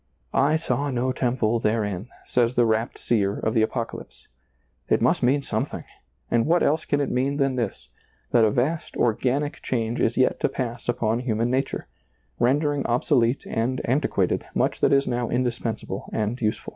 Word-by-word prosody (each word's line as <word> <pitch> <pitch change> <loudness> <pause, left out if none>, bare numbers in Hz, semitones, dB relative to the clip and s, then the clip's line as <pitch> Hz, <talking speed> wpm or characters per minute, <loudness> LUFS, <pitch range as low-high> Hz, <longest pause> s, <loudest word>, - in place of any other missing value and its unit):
" - - -40 0.2
I - - +3
saw 145 -3 -1
no 130 0 0
temple 120 -3 0
therein," 105 -2 -1 0.2
says 120 0 +1
the 120 - +4
rapt 110 +1 0
seer 100 -4 0
of 110 - -1
the 110 - +3
Apoca 115 +1 -1
lypse. - - -16 0.6
It - - +3
must - - +2
mean 135 +3 +2
something, - - -3 0.5
and 115 +2 +2
what 170 +2 +3
else 155 +2 +1
can 145 - +1
it 140 - -1
mean 135 +3 0
than 135 -2 +1
this, 115 -5 -3 0.4
that 120 - +5
a 110 - +5
vast 140 +9 -1
organic 130 +5 0
change 115 -2 -1
is 115 - +1
yet 130 - +2
to - - +1
pass 120 -2 -4
upon 115 -1 +1
human 120 -1 0
nature, 135 +1 -1 0.5
rendering 145 +3 +2
obso 125 +5 +1
lete 120 +3 0
and 120 +3 -1
antiquated 135 +5 +1
much - - 0
that - - +4
is 140 0 +4
now 120 -1 -1
indispens 120 -3 -1
able 95 +1 -6
and 110 +3 -2
useful. 110 -1 -1
120 Hz, 185 wpm, -24 LUFS, 115-135 Hz, 0.6 s, that